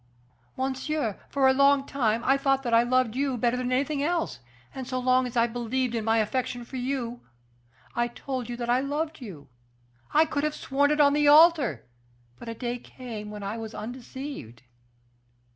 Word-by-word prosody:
"Monsieur, 265 Hz, -3 st, -2 dB
for 275 Hz, -1 st, +3 dB
a 265 Hz, -, +5 dB
long 275 Hz, 0 st, +4 dB
time 235 Hz, -5 st, 0 dB
I 270 Hz, -, +4 dB
thought 270 Hz, -1 st, +1 dB
that 240 Hz, -2 st, -2 dB
I 230 Hz, -, +7 dB
loved 245 Hz, -1 st, +1 dB
you 270 Hz, -1 st, 0 dB
better 240 Hz, +1 st, +1 dB
than 250 Hz, 0 st, -2 dB
anything 280 Hz, +3 st, 0 dB
else; 330 Hz, -, -1 dB, 0.3 s
and 260 Hz, -2 st, -6 dB
so 255 Hz, -, -2 dB
long 255 Hz, 0 st, +2 dB
as 245 Hz, -, -6 dB
I 230 Hz, -, +5 dB
believed 240 Hz, +1 st, -2 dB
in 230 Hz, -2 st, -1 dB
my 225 Hz, +1 st, +2 dB
affection 240 Hz, +2 st, -1 dB
for 260 Hz, -, -7 dB
you, 245 Hz, -2 st, -3 dB, 0.7 s
I 240 Hz, 0 st, +1 dB
told 250 Hz, 0 st, -5 dB
you 240 Hz, -, -4 dB
that 240 Hz, +2 st, +1 dB
loved 305 Hz, +2 st, -3 dB
you. 175 Hz, -, -9 dB, 0.6 s
I 310 Hz, +2 st, +5 dB
could 290 Hz, -2 st, -2 dB
have 305 Hz, 0 st, 0 dB
sworn 285 Hz, +2 st, +1 dB
it 300 Hz, 0 st, +1 dB
on 285 Hz, -1 st, +6 dB
the 295 Hz, 0 st, +3 dB
altar; 295 Hz, -, +5 dB, 0.5 s
but 230 Hz, -, -8 dB
a 230 Hz, -, -5 dB
day 245 Hz, +1 st, -3 dB
came 230 Hz, -5 st, -8 dB
when 210 Hz, -1 st, -7 dB
I 210 Hz, +3 st, -4 dB
was 220 Hz, 0 st, -7 dB
undeceived." 245 Hz, -, -8 dB
255 Hz, 185 wpm, -27 LUFS, 235-275 Hz, 0.7 s, I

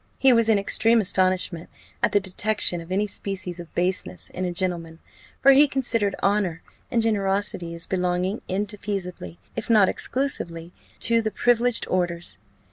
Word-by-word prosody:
He 265 Hz, -1 st, +5 dB
was 230 Hz, -1 st, +3 dB
in 220 Hz, -, +5 dB
extreme 225 Hz, +3 st, +3 dB
astonishment 185 Hz, -3 st, +1 dB, 0.3 s
at -, -, +2 dB
the 205 Hz, -, +4 dB
detection 190 Hz, -2 st, 0 dB
of 165 Hz, +2 st, -12 dB
any 200 Hz, +3 st, +1 dB
species 190 Hz, -3 st, -3 dB
of 170 Hz, -1 st, -10 dB
baseness 175 Hz, -, -2 dB
in 185 Hz, -, -3 dB
a 180 Hz, -, -2 dB
gentleman; 170 Hz, -2 st, -2 dB, 0.5 s
for 275 Hz, -, +8 dB
he 285 Hz, +2 st, +6 dB
considered 230 Hz, -7 st, 0 dB
honour 195 Hz, -5 st, 0 dB, 0.3 s
and 235 Hz, -4 st, +1 dB
generosity 195 Hz, -5 st, 0 dB
as 170 Hz, -, +4 dB
belonging 180 Hz, +2 st, -1 dB
indefeasibly, 190 Hz, -, -4 dB, 0.2 s
if -, -, -5 dB
not 210 Hz, -4 st, +5 dB
exclusively, 170 Hz, -11 st, -2 dB, 0.3 s
to 230 Hz, 0 st, +4 dB
the 220 Hz, -, -1 dB
privileged 245 Hz, +1 st, +1 dB
orders. 170 Hz, -, -2 dB
190 Hz, 150 wpm, -24 LUFS, 175-220 Hz, 0.5 s, for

